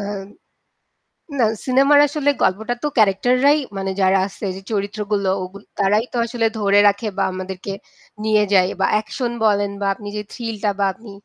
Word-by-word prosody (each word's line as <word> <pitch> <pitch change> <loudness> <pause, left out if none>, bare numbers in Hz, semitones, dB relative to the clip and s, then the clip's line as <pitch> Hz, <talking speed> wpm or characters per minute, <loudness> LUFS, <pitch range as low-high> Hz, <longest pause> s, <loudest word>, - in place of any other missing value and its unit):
আম 200 -1 -5 1.2
না - - +4 0.2
সিনেমার 275 +3 +5
আসলে 290 0 0
গল্পটা 220 +5 +1
তো 295 - +1
ক্যারাক্টার 215 +3 +3
রাই 295 +2 +6 0.2
মানে 195 0 -2
যারা 190 +1 +4
আছে 200 +1 -8
যে 190 - -8
চরিত্রগুলো 205 -1 -1
ওগুল 195 +2 -10 0.2
তারাই 210 +3 +2
তো 245 - -2
আসলে 235 -1 -1
ধরে 200 0 +4
রাখে 205 +2 +1
বা - - +2
আমাদেরকে 185 +1 -6 0.5
নিয়ে 215 -1 +3
যায় 185 -1 +5
বা - - +3
অ্যাকশন 235 +3 -1
বলেন 205 -1 +2
বা 200 - 0
আপনি 205 +1 -11
যে - - -2
থ্রিলটা 220 -3 -2
বা 200 - +3
আপনি 220 +1 -13
205 Hz, 170 wpm, -20 LUFS, 195-230 Hz, 1.2 s, রাই